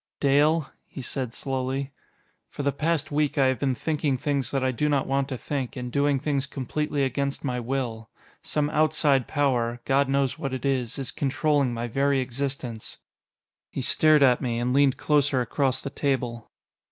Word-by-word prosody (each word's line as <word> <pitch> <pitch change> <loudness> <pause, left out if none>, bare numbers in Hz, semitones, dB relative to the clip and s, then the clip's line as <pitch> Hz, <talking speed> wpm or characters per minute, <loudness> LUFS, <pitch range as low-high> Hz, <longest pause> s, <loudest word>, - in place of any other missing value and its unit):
"Dale," 145 +2 +3 0.2
he 135 - -8
said 130 -2 -3
slowly, 135 +1 -3 0.6
"for 145 - -5
the 140 - +2
past 155 +1 -1
week 150 0 0
I 135 - +4
have 130 -2 +1
been 135 -2 0
thinking 145 +1 -1
things 140 0 0
that 135 -2 -1
I 130 - +2
do 150 +4 0
not 140 -2 +1
want 135 0 0
to 130 - -3
think 135 0 -4
and 125 -1 -5
doing 140 +1 +2
things 140 0 0
completely 145 +2 -2
against 140 +1 -1
my 125 -3 -1
will. 120 -3 -3 0.3
Some 150 -1 -1
outside 150 -4 +2
power 125 -5 0
God 135 0 +2
knows 135 -1 +1
what 135 -1 -2
it 130 - -6
is 130 -3 0
is 135 -2 -3
controlling 145 -1 +1
my 120 0 -3
very 135 +3 +1
existence." 130 -3 -4 0.7
He - - -4
stared 155 -2 +4
at 125 -2 +4
me, 120 -3 -1
and 120 +1 0
leaned 140 -1 +4
closer 145 -3 +2
across 130 +1 0
the 140 - -5
table. 125 -6 -2
135 Hz, 175 wpm, -26 LUFS, 125-145 Hz, 0.7 s, I